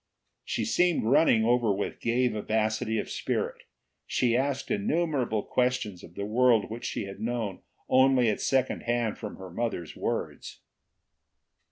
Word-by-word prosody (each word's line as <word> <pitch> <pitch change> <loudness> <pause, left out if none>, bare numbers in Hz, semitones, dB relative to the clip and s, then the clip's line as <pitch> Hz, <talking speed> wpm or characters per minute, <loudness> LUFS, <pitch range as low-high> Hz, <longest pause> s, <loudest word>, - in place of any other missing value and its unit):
She - - -2
seemed 180 -7 +2
running 120 -2 +4
over 120 -2 +3
with 100 +1 -3
gay 125 +2 +1
vivacity 110 +1 -1
of - - -2
spirit; - - -3 0.4
she 120 -2 +1
asked 135 +1 -1
innumerable 165 - 0
questions 125 -7 -1
of 85 - -13
the 100 - -3
world 115 0 +3
which 115 +2 -6
she - - -2
had 95 0 -8
known 115 -4 -3 0.3
only 130 -1 +4
at 105 - 0
second 130 -1 +1
hand 120 -2 -1
from 105 - -6
her 95 -1 -10
mother's 90 -5 -3
words. - - -4
120 Hz, 145 wpm, -28 LUFS, 110-130 Hz, 0.4 s, running